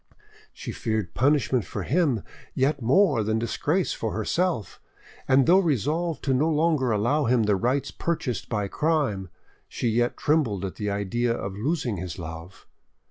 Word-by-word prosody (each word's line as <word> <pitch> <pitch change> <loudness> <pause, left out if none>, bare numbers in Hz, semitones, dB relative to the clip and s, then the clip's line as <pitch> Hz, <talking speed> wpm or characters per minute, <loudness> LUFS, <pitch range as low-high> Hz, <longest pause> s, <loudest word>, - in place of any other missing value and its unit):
She - - -7
feared 110 -6 -2
punishment 130 -3 +2
for 100 +1 -5
him 140 - +1 0.3
yet 140 +1 +1
more 135 - +4
than 110 +1 0
disgrace 145 - 0
for 110 - -3
herself, 115 - -1 0.5
and 135 0 +5
though 180 +3 +6
resolved 160 - 0
to 135 - +1
no 145 +5 +2
longer 155 -4 +2
allow 120 +8 +1
him 120 -1 +3
the 105 -1 +2
rights 125 +8 0
purchased 160 -7 -3
by 105 -3 -1
crime, 140 - 0 0.4
she 120 - -2
yet 120 +2 +1
trembled 120 - +1
at 95 - -6
the 105 -1 -2
idea 100 +4 -1
of 95 -3 -5
losing 125 - -1
his 90 -1 -5
love. 85 +1 -9
120 Hz, 155 wpm, -25 LUFS, 105-150 Hz, 0.5 s, though